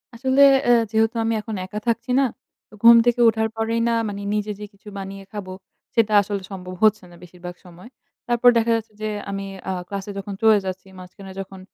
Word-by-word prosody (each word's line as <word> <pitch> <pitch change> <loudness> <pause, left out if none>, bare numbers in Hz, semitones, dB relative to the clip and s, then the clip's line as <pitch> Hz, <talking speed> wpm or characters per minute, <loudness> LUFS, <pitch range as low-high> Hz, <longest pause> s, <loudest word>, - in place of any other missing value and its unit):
আসলে 260 +3 +1 0.3
এ - - +7 0.2
যেহেতু 225 +1 +1
আমি 225 - 0
এখন 215 0 -6
একা 210 +3 -6
থাকছি 235 +2 -1
না, 275 - +4 0.5
তো - - -24
ঘুম 235 0 +10
থেকে 240 0 +2
ওঠার 220 0 -1
পরেই 225 +1 -1
না 235 - +1 0.2
মানে 200 0 -6
নিজে 210 0 -2
যে 210 - -6
কিছু 200 +1 -21
বানিয়ে 195 0 -7
খাবো 195 -3 -7 0.4
সেটা 225 -2 +2
আসলে 200 0 -4
সম্ভব 185 -1 -7
হচ্ছে 215 -2 +4
না - - -14
বেশিরভাগ 180 0 -10
সময়। 180 +5 -14 0.4
তারপর 240 0 +4
দেখা 230 0 +2
যাচ্ছে 220 -1 -5
যে 215 - -2 0.2
আমি 195 0 -4 0.2
আ - - 0 0.2
ক্লাসে 200 0 -6
যখন 195 +1 -6
চলে 220 -1 +6
যাচ্ছি 185 0 -6
মাঝখানে 190 +1 -12
যখন 190 0 -8
210 Hz, 200 wpm, -22 LUFS, 195-225 Hz, 0.5 s, ঘুম